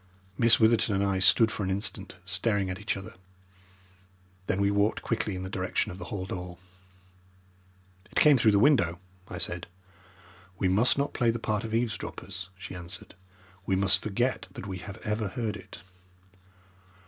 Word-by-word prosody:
Miss 115 Hz, -2 st, +5 dB
Witherton 110 Hz, -2 st, +4 dB
and 100 Hz, -, +1 dB
I 100 Hz, -1 st, +1 dB
stood 110 Hz, +4 st, +5 dB
for -, -, -4 dB
an 95 Hz, -, -1 dB
instant 95 Hz, 0 st, -2 dB
staring 95 Hz, +1 st, 0 dB
at 90 Hz, -, -5 dB
each 105 Hz, 0 st, -2 dB
other. 95 Hz, -, -9 dB, 1.3 s
Then 95 Hz, -, 0 dB
we 100 Hz, 0 st, +3 dB
walked 100 Hz, +2 st, +1 dB
quickly 110 Hz, -4 st, -1 dB
in 90 Hz, -, -5 dB
the -, -, -4 dB
direction 95 Hz, -1 st, -1 dB
of 90 Hz, -, -9 dB
the 90 Hz, -, -6 dB
hall 95 Hz, +1 st, -4 dB
door. 90 Hz, -1 st, -6 dB, 1.5 s
"It -, -, -21 dB
came 150 Hz, -2 st, +7 dB
through 110 Hz, -4 st, +4 dB
the -, -, +5 dB
window," 100 Hz, -, +4 dB, 0.3 s
I 90 Hz, -, -6 dB
said. 85 Hz, 0 st, -3 dB, 0.9 s
"We 95 Hz, -, +1 dB
must 105 Hz, +9 st, +3 dB
not 140 Hz, +1 st, 0 dB
play 120 Hz, -2 st, +2 dB
the 115 Hz, -, +1 dB
part 110 Hz, -1 st, -1 dB
of 110 Hz, 0 st, -3 dB
eavesdroppers," 95 Hz, -5 st, -3 dB
she 95 Hz, -1 st, -8 dB
answered. 90 Hz, +1 st, -7 dB, 0.5 s
"We 95 Hz, -, +2 dB
must 95 Hz, 0 st, +3 dB
forget 120 Hz, +5 st, -1 dB
that -, -, -7 dB
we 95 Hz, -2 st, -5 dB
have 95 Hz, +1 st, -8 dB
ever 105 Hz, 0 st, -1 dB
heard 110 Hz, +2 st, -3 dB
it." -, -, -11 dB
100 Hz, 170 wpm, -28 LUFS, 95-110 Hz, 1.5 s, came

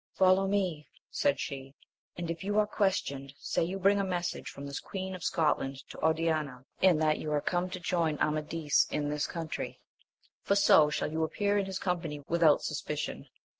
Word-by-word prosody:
Follow 190 Hz, +1 st, +4 dB
me, 185 Hz, -7 st, -1 dB, 0.2 s
said 140 Hz, -2 st, +1 dB
she, 135 Hz, 0 st, -6 dB, 0.4 s
and 170 Hz, -1 st, -3 dB
if 165 Hz, +1 st, -6 dB
you 205 Hz, +2 st, -1 dB
are 215 Hz, -, +5 dB
questioned, 140 Hz, -10 st, -1 dB
say -, -, -1 dB
you 180 Hz, +4 st, -2 dB
bring 200 Hz, +1 st, +3 dB
a -, -, +1 dB
message 180 Hz, -2 st, -2 dB
from 140 Hz, -, -8 dB
the 140 Hz, 0 st, -6 dB
Queen 190 Hz, -1 st, -5 dB
of 185 Hz, -, -7 dB
Scotland 150 Hz, -6 st, 0 dB
to -, -, -10 dB
Oriana, 155 Hz, -5 st, 0 dB, 0.2 s
and 185 Hz, -4 st, +5 dB
that 155 Hz, -1 st, +2 dB
you 155 Hz, -, -4 dB
are 150 Hz, -, +2 dB
come 175 Hz, +4 st, -1 dB
to 185 Hz, 0 st, -5 dB
join 170 Hz, -4 st, 0 dB
Amadis 155 Hz, 0 st, +1 dB
in 145 Hz, -1 st, -1 dB
this 150 Hz, 0 st, -1 dB
country, 165 Hz, -2 st, -5 dB, 0.6 s
for 200 Hz, -, +1 dB
so 160 Hz, -6 st, +6 dB
shall 150 Hz, -, -2 dB
you 160 Hz, +1 st, 0 dB
appear 205 Hz, +5 st, +1 dB
in 195 Hz, -, -2 dB
his 190 Hz, -1 st, -3 dB
company 165 Hz, -6 st, -3 dB
with 170 Hz, +1 st, 0 dB
out 155 Hz, -3 st, +5 dB
suspicion. -, -, -4 dB
165 Hz, 190 wpm, -30 LUFS, 150-190 Hz, 0.6 s, so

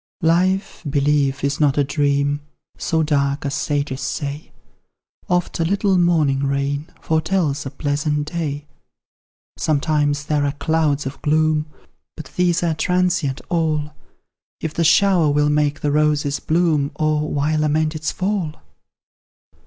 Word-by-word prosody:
Life, 185 Hz, +4 st, +1 dB
believe, 140 Hz, -1 st, +1 dB
is 140 Hz, 0 st, 0 dB
not 145 Hz, -2 st, +2 dB
a 145 Hz, -, +4 dB
dream 145 Hz, 0 st, 0 dB, 0.3 s
So 160 Hz, -1 st, 0 dB
dark 140 Hz, -2 st, 0 dB
as 140 Hz, -, -2 dB
sages 140 Hz, -3 st, -2 dB
say; 145 Hz, +1 st, -4 dB, 0.8 s
Oft 180 Hz, -1 st, 0 dB
a -, -, +2 dB
little 195 Hz, +3 st, +1 dB
morning 160 Hz, -6 st, +2 dB
rain 140 Hz, +2 st, -1 dB
Foretells 160 Hz, -3 st, 0 dB
a -, -, -3 dB
pleasant 150 Hz, +1 st, -2 dB
day. 150 Hz, -3 st, -3 dB, 0.9 s
Sometimes 145 Hz, -1 st, +1 dB
there 150 Hz, -1 st, 0 dB
are 140 Hz, -1 st, 0 dB
clouds 150 Hz, -1 st, 0 dB
of 135 Hz, -, -6 dB
gloom, 155 Hz, 0 st, +2 dB, 0.5 s
But 150 Hz, -4 st, -9 dB
these 175 Hz, -1 st, +2 dB
are 165 Hz, -2 st, +1 dB
transient 180 Hz, -5 st, 0 dB
all; 155 Hz, -3 st, 0 dB, 0.7 s
If 160 Hz, -2 st, -4 dB
the 165 Hz, -, 0 dB
shower 180 Hz, -1 st, +4 dB
will 150 Hz, +1 st, +2 dB
make 150 Hz, -1 st, +1 dB
the 145 Hz, -, 0 dB
roses 150 Hz, -1 st, +1 dB
bloom, 155 Hz, -4 st, +1 dB
O 155 Hz, -1 st, +1 dB
why 150 Hz, +1 st, 0 dB
lament 155 Hz, +1 st, +1 dB
its 155 Hz, -1 st, -2 dB
fall? 185 Hz, -5 st, -2 dB
150 Hz, 135 wpm, -20 LUFS, 145-160 Hz, 0.9 s, a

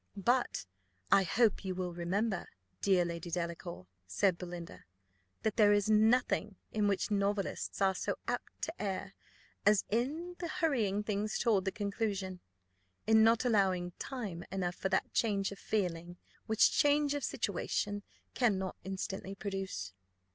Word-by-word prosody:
"But 240 Hz, -, +1 dB, 0.5 s
I 195 Hz, -, +7 dB
hope 215 Hz, +4 st, +2 dB
you 190 Hz, -1 st, -3 dB
will 180 Hz, -1 st, -3 dB
remember, 190 Hz, +3 st, -1 dB, 0.3 s
dear 185 Hz, -3 st, +4 dB
Lady 170 Hz, +1 st, -5 dB
Delacour," 170 Hz, -, -4 dB, 0.2 s
said 180 Hz, -, +2 dB
Belinda, 175 Hz, -1 st, -8 dB, 0.6 s
"that 220 Hz, -1 st, 0 dB
there 205 Hz, -2 st, +6 dB
is 205 Hz, +1 st, +2 dB
nothing 215 Hz, -1 st, +3 dB, 0.2 s
in 210 Hz, -1 st, +1 dB
which 200 Hz, +2 st, 0 dB
novelists 200 Hz, 0 st, 0 dB
are 190 Hz, 0 st, +4 dB
so -, -, -2 dB
apt -, -, -4 dB
to 325 Hz, -, -1 dB
err 195 Hz, -1 st, -3 dB, 0.5 s
as 210 Hz, -1 st, +5 dB
in 310 Hz, +10 st, -1 dB
hurrying 280 Hz, -, 0 dB
things 210 Hz, 0 st, -1 dB
toward 210 Hz, -5 st, +2 dB
the 195 Hz, -, +1 dB
conclusion: 200 Hz, -3 st, -2 dB, 0.7 s
in 220 Hz, 0 st, +6 dB
not 230 Hz, +2 st, +4 dB
allowing 190 Hz, -6 st, +2 dB
time 210 Hz, -11 st, -5 dB
enough 180 Hz, -2 st, -1 dB
for 190 Hz, -, -2 dB
that 190 Hz, -, 0 dB
change 200 Hz, -4 st, +1 dB
of 200 Hz, -, -9 dB
feeling, 175 Hz, -4 st, -2 dB, 0.3 s
which 220 Hz, 0 st, +5 dB
change 290 Hz, 0 st, +3 dB
of 290 Hz, -2 st, -2 dB
situation 205 Hz, -1 st, -1 dB, 0.3 s
cannot 190 Hz, -7 st, +1 dB
instantly 190 Hz, +1 st, -4 dB
produce." 195 Hz, -, -4 dB
200 Hz, 140 wpm, -33 LUFS, 185-220 Hz, 0.7 s, I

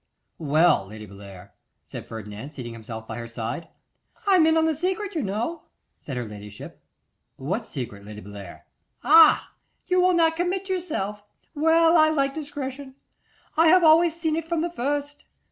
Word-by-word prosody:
'Well, 155 Hz, -, +3 dB
Lady 105 Hz, +1 st, -10 dB
Bellair,' 100 Hz, -2 st, -13 dB, 0.3 s
said -, -, -9 dB
Ferdinand, 110 Hz, +3 st, -8 dB
seating 125 Hz, -6 st, -8 dB
himself 110 Hz, 0 st, -9 dB
by 115 Hz, +1 st, -6 dB
her 115 Hz, -, -6 dB
side. 115 Hz, +8 st, -5 dB, 0.6 s
'I 400 Hz, -, +4 dB
am 320 Hz, -3 st, +5 dB
in 320 Hz, 0 st, +3 dB
the 320 Hz, -, +2 dB
secret, 380 Hz, +6 st, -2 dB
you 320 Hz, -, -1 dB
know,' 235 Hz, -, -3 dB, 0.4 s
said 135 Hz, -4 st, -7 dB
her 120 Hz, -, -3 dB
ladyship. 105 Hz, -1 st, -11 dB, 0.5 s
'What 190 Hz, -, -4 dB
secret, 110 Hz, -7 st, -7 dB
Lady 105 Hz, +1 st, -9 dB
Bellair?' 100 Hz, -3 st, -11 dB, 0.4 s
'Ah! 320 Hz, +1 st, +6 dB, 0.3 s
you 365 Hz, -1 st, +2 dB
will 365 Hz, 0 st, +3 dB
not 325 Hz, -1 st, +3 dB
commit 365 Hz, +3 st, -2 dB
yourself. 295 Hz, -, -3 dB, 0.3 s
Well, 325 Hz, +2 st, +4 dB
I 310 Hz, 0 st, +6 dB
like 275 Hz, -3 st, 0 dB
discretion. 280 Hz, -3 st, -6 dB, 0.6 s
I 325 Hz, +1 st, +5 dB
have 360 Hz, +2 st, +6 dB
always 330 Hz, +1 st, +5 dB
seen 320 Hz, -2 st, 0 dB
it 325 Hz, 0 st, -4 dB
from 335 Hz, -1 st, -1 dB
the 340 Hz, +1 st, -2 dB
first. 290 Hz, 0 st, -3 dB
275 Hz, 160 wpm, -24 LUFS, -, 0.6 s, Ah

